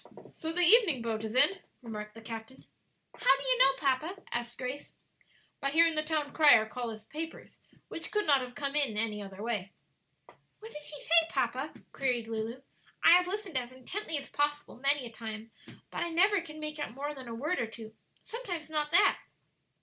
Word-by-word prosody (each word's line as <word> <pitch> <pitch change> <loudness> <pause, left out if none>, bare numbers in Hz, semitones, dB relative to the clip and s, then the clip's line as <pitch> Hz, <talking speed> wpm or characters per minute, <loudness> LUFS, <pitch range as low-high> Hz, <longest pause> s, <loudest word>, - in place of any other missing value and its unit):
"So 320 - -3
the 355 +2 0
evening 345 - +6
boat 220 -1 -2
is 220 +1 -4
in," 385 +9 +4 0.2
remarked 210 -2 -7
the 225 - -11
captain. 225 +2 -8 0.5
"How - - +4
do - - -7
you - - +2
know, 275 - +6
papa?" 285 +6 0 0.2
asked 240 0 -3
Grace. 255 +3 -5 0.7
"By 275 - 0
hearing 330 +3 +5
the 310 - +2
town 305 -2 -2
crier 285 -8 +7
calling 230 +1 -5
his 215 0 -17
papers; 320 +5 -7 0.3
which 330 0 -6
could 420 0 0
not 280 -3 +5
have 250 -1 -7
come 280 +1 -2
in 275 -8 +2
any 215 -1 -1
other 195 0 -8
way." 210 -5 -3 0.9
"What 445 +1 -11
does 300 0 -8
he 295 - -6
say, 330 0 +5
papa?" 270 +1 -1 0.2
queried 250 -4 -1
Lulu. 225 +3 -4 0.4
"I 330 - +8
have 360 +1 +6
listened 380 -7 -2
as 245 0 -7
intently 315 +7 -4
as 275 - -8
possible 290 -2 -1
many 275 +1 +1
a 235 - -8
time, 225 -1 -7 0.4
but - - -4
I 345 - -1
never 380 +4 +3
can 310 -2 -10
make 305 0 -5
out 240 -6 -4
more 290 +2 -4
than 265 -3 -9
a 230 - -5
word 300 +10 -1
or 230 - -1
two, 220 -1 -10 0.3
sometimes 360 -10 -6
not 300 -1 -1
that." 395 +5 +4
280 Hz, 195 wpm, -31 LUFS, 235-325 Hz, 0.9 s, I